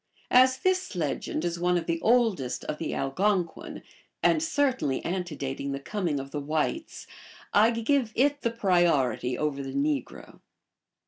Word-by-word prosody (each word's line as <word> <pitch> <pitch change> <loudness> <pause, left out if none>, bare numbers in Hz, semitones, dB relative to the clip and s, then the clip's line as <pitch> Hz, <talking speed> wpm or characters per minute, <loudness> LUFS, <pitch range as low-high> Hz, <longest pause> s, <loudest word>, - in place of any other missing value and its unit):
As 255 +1 +6
this 370 - 0
legend 155 0 -2
is 170 0 -2
one 180 0 +2
oi - - 0
the 165 0 -2
oldest 220 - +1
of 150 - -4
the 165 - -3
Algonquin, 180 +5 -1 0.4
and 320 - +4
certainly 260 - 0
antedating 145 -6 -3
the 140 - -4
com 195 +6 -3
ing 145 -3 0
of 135 0 -8
the 150 - -3
whites, 155 - -2 0.5
I 215 +2 +6
give 235 +1 0
it 285 +3 +2
the 235 - +1
priority 170 - +1
over 150 -2 -1
the 135 -1 -6
negro. 290 0 -3
180 Hz, 150 wpm, -27 LUFS, 145-245 Hz, 0.5 s, As